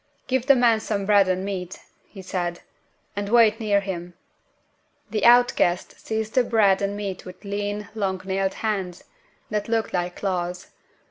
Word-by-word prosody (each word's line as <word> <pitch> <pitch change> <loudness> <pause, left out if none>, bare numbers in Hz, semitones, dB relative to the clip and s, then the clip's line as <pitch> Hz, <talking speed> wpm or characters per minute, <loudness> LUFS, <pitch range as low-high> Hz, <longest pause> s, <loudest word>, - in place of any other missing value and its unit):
"Give 260 0 -1
the 275 - +7
man 235 -3 +4
some 205 -2 -2
bread 200 -1 +5
and 185 +1 -1
meat," 185 -2 -5 0.3
he 195 -3 -11
said, 175 -2 -3 0.5
"and 200 0 -3
wait 225 -1 +5
near 205 -3 +2
him." 175 -3 -6 1.0
The 215 - -1
outcast 240 -7 +4
seized 220 0 -3
on - - +4
the - - -9
bread 205 -4 +4
and 200 0 -1
meat 195 -3 -5
with 185 +2 -12
lean, 205 +1 -3
long 195 -4 -2
nailed 190 0 -1
hands 190 -5 -2 0.5
that 210 +1 -2
looked 225 -1 0
like 175 -1 -1
claws. 180 -2 -3
200 Hz, 160 wpm, -24 LUFS, 185-220 Hz, 1.0 s, the